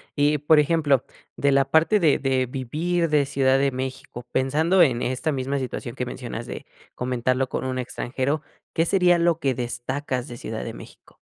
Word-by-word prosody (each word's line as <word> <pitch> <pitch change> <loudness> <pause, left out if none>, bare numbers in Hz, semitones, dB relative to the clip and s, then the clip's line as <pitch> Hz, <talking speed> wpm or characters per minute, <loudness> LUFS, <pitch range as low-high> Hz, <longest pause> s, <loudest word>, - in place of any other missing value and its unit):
Y, 145 +1 +3
por 150 +2 +5
ejemplo, 150 -3 +2 0.3
de 140 - +2
la 135 0 +4
parte 160 +9 +3
de 160 -6 +3
de 130 -1 +1
vivir 155 +7 -1
de 150 -2 +3
Ciudad 135 -1 +2
de 140 0 +2
México 130 -2 -6
pensando 155 +8 +2
en 125 -7 +3
esta 130 +5 -1
misma 135 0 -2
situación 130 -3 -5
que - - -3
mencionas - - -6
de - - -7 0.3
comentarlo 130 +1 0
con - - -3
un 130 0 -2
extranjero, 130 +4 -2 0.3
¿qué 165 - +2
sería 180 -1 +4
lo 170 -1 +2
que 135 -4 +1
destacas 125 +2 -3
de 120 - -8
Ciudad - - -5
de - - -6
México? - - -14
135 Hz, 180 wpm, -24 LUFS, 130-155 Hz, 0.3 s, por